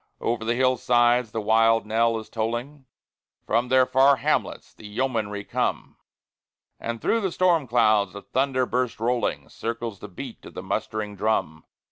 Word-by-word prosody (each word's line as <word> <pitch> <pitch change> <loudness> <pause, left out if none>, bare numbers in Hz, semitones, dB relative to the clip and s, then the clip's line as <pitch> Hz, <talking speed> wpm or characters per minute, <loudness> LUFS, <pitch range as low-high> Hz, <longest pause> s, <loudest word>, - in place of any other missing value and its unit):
Over 115 -1 -1
the 115 +1 0
hillsides 125 -2 +3
the 110 - -3
wild 115 +1 +3
knell 115 +1 +1
is 110 - -7
tolling, 120 +5 -4 0.6
From 120 +3 +1
their 130 0 +4
far 135 +2 +5
hamlets - - -2
the 105 - -12
yeomanry 105 -3 -2
come; - - -2 0.8
As 115 0 -4
through 225 - 0
the 190 -3 -1
storm 170 -6 +2
clouds 110 -5 +3
the 100 - -9
thunder 130 -1 0
burst 125 -3 -2
rolling, 120 +2 -1
Circles 115 -3 -5
the - - -8
beat 90 - -9
of - - -12
the - - -6
mustering 105 -1 -3
drum. 95 -7 -1
115 Hz, 155 wpm, -25 LUFS, 110-130 Hz, 0.8 s, far